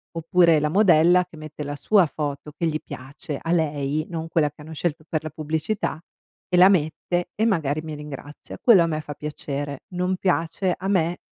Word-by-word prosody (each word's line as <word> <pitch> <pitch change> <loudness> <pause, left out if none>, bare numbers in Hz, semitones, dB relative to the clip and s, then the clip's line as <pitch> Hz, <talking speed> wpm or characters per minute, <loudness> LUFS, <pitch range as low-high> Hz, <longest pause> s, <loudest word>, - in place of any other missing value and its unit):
Oppure 165 0 +4
la 150 +1 0
modella 175 -1 +5
che 175 -2 -15
mette 155 -1 -7
la 145 0 -4
sua 195 +5 +4
foto 150 -1 -5
che 165 +3 -2
gli 155 - 0
piace, 140 +3 -7
a 165 - -3
lei, 150 -2 0
non 165 -2 -4
quella 155 -3 +1
che 150 - -17
hanno 160 +2 -9
scelto 160 0 -3
per 155 -2 -1
la 155 - -4
pubblicità, 160 +5 -2 0.5
e 180 - +1
la 185 +2 +8
mette 175 0 0
e 220 - +1
magari 155 -7 0
mi 155 -1 -6
ringrazia. 150 0 -9
Quello 210 -8 +7
a - - 0
me 155 -1 -2
fa 145 -1 -8
piacere. 145 -2 -5
Non 180 +1 0
piace 180 +1 0
a 190 - -5
me 175 -3 +1
160 Hz, 195 wpm, -24 LUFS, 150-175 Hz, 0.5 s, la